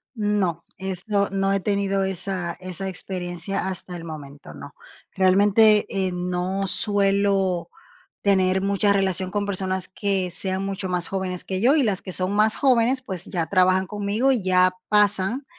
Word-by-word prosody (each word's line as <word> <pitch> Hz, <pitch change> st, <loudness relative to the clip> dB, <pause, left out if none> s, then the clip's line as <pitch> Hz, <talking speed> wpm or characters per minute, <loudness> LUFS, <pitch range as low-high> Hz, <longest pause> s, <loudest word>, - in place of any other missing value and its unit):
No, 205 Hz, -6 st, 0 dB, 0.2 s
eso, 195 Hz, +2 st, -1 dB
no 195 Hz, 0 st, 0 dB
he 195 Hz, -, 0 dB
tenido 195 Hz, -1 st, 0 dB
esa 190 Hz, -2 st, -2 dB
esa 185 Hz, +1 st, -5 dB
experiencia 180 Hz, +1 st, -4 dB
hasta 185 Hz, -1 st, -6 dB
el 165 Hz, -, -8 dB
momento, 145 Hz, -3 st, -10 dB
no. 140 Hz, 0 st, -11 dB, 0.4 s
Realmente, 205 Hz, +3 st, +4 dB, 0.2 s
eh, 185 Hz, -, -3 dB
no 180 Hz, +2 st, -2 dB
suelo 195 Hz, -3 st, +1 dB, 0.5 s
tener 190 Hz, -1 st, +2 dB
mucha 200 Hz, +1 st, +2 dB
relación 190 Hz, -2 st, +1 dB
con 205 Hz, -1 st, -1 dB
personas 190 Hz, -1 st, -1 dB
que 190 Hz, -2 st, -1 dB
sean 190 Hz, +2 st, -3 dB
mucho 195 Hz, -1 st, -4 dB
más 180 Hz, -1 st, +2 dB
jóvenes 185 Hz, -2 st, -3 dB
que 190 Hz, -1 st, -2 dB
yo, 255 Hz, +7 st, +4 dB
y 300 Hz, -, +3 dB
las 205 Hz, -6 st, -1 dB
que 185 Hz, -, -6 dB
son 185 Hz, +2 st, -1 dB
más 215 Hz, +1 st, +3 dB
jóvenes, 255 Hz, 0 st, +2 dB
pues 185 Hz, -7 st, -6 dB
ya 170 Hz, -4 st, -3 dB
trabajan 185 Hz, 0 st, +2 dB
conmigo 210 Hz, +5 st, 0 dB
y 240 Hz, -7 st, +1 dB
ya 185 Hz, 0 st, +3 dB
pasan 210 Hz, +4 st, +1 dB
190 Hz, 160 wpm, -23 LUFS, 185-200 Hz, 0.5 s, Realmente